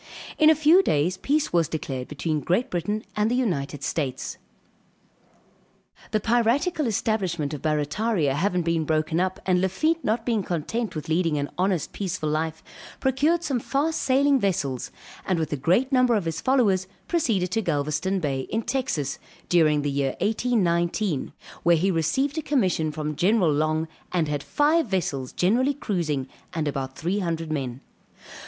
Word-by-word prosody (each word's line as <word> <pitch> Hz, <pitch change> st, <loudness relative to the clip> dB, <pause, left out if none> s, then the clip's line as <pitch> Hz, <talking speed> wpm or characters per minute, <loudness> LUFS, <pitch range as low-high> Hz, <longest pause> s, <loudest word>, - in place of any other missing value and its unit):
In 310 Hz, -1 st, +7 dB
a 315 Hz, -, +6 dB
few 315 Hz, +5 st, +6 dB
days 170 Hz, -, +1 dB
peace 295 Hz, +1 st, 0 dB
was 170 Hz, -3 st, +3 dB
declared 135 Hz, -5 st, -4 dB
between 155 Hz, +1 st, -2 dB
Great 190 Hz, -, 0 dB
Britain 205 Hz, +5 st, -2 dB
and 210 Hz, +1 st, +2 dB
the 245 Hz, -, +1 dB
United 145 Hz, -, -1 dB
States. 135 Hz, -3 st, -3 dB, 1.7 s
The 215 Hz, -, +1 dB
piratical 240 Hz, -, +1 dB
establishment 185 Hz, -9 st, -1 dB
of 150 Hz, -, -5 dB
Barrataria 155 Hz, +2 st, 0 dB
having 180 Hz, +4 st, 0 dB
been 165 Hz, -1 st, +1 dB
broken 155 Hz, +1 st, 0 dB
up 185 Hz, +1 st, -1 dB
and 180 Hz, -1 st, +2 dB
Lafitte 310 Hz, -, +1 dB
not 225 Hz, +2 st, 0 dB
being 230 Hz, -4 st, +1 dB
content 185 Hz, +6 st, -3 dB
with 155 Hz, -, -5 dB
leading 165 Hz, -1 st, +1 dB
an 145 Hz, 0 st, -3 dB
honest, 185 Hz, -3 st, 0 dB
peaceful 180 Hz, -5 st, -3 dB
life, 160 Hz, +1 st, -2 dB, 0.4 s
procured 295 Hz, +6 st, +2 dB
some 270 Hz, -7 st, 0 dB
fast 290 Hz, +7 st, -1 dB
sailing 275 Hz, +1 st, +3 dB
vessels, 145 Hz, -, -1 dB, 0.3 s
and 185 Hz, -, 0 dB
with 160 Hz, -2 st, -2 dB
a -, -, +1 dB
great 185 Hz, -, +2 dB
number 255 Hz, -2 st, +4 dB
of 200 Hz, -5 st, 0 dB
his 165 Hz, 0 st, -3 dB
followers, 205 Hz, -9 st, +2 dB, 0.2 s
proceeded 220 Hz, -, 0 dB
to 225 Hz, -, +1 dB
Galvezton 155 Hz, +3 st, -1 dB
Bay, 135 Hz, -5 st, -2 dB
in 225 Hz, +2 st, -1 dB
Texas, 245 Hz, -, -2 dB, 0.3 s
during 155 Hz, -4 st, +4 dB
the 145 Hz, -, 0 dB
year 140 Hz, -1 st, -1 dB
1819; 195 Hz, -, 0 dB, 0.3 s
where 170 Hz, 0 st, +4 dB
he 190 Hz, +4 st, +2 dB
received 265 Hz, -, 0 dB
a -, -, -2 dB
commission 185 Hz, -, +1 dB
from 150 Hz, 0 st, -4 dB
General 185 Hz, -2 st, +3 dB
Long; 155 Hz, +2 st, 0 dB, 0.2 s
and 170 Hz, -4 st, +1 dB
had 145 Hz, -1 st, -2 dB
five 300 Hz, -, +2 dB
vessels 150 Hz, -, -2 dB
generally 250 Hz, +10 st, +2 dB
cruising 165 Hz, -, -2 dB, 0.3 s
and 155 Hz, -2 st, -1 dB
about 135 Hz, -2 st, -3 dB
300 170 Hz, -3 st, -2 dB
men. 135 Hz, -4 st, -3 dB
180 Hz, 160 wpm, -25 LUFS, 155-235 Hz, 1.7 s, In